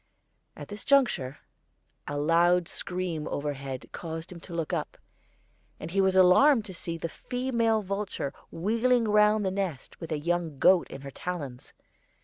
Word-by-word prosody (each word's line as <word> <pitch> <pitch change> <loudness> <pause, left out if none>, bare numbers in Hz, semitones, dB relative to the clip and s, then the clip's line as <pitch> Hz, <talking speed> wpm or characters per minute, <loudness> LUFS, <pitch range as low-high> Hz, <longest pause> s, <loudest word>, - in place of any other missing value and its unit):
At - - -9
this 205 +1 -7
juncture 240 - +2 0.7
a 145 - -3
loud 170 +3 +3
scream 175 -4 -2
overhead 140 -3 -4
caused 165 0 -6
him 175 - -9
to 170 - -11
look 165 -2 -2
up, - - -3 0.8
and 160 - -7
he 195 +2 +2
was 190 -1 +2
alarmed 210 +7 +6
to 190 - -8
see 170 -1 -5
the 165 - -3
female 235 - -1
vulture 195 -7 -3 0.2
wheeling 230 +7 +1
round 210 0 +4
the 190 - 0
nest 185 -8 -4
with 165 -1 -7
a 155 - 0
young 165 -1 -1
goat 185 +4 +5
in 135 - -8
her 140 0 -8
talons. 140 -6 -6
180 Hz, 155 wpm, -28 LUFS, 160-210 Hz, 0.8 s, alarmed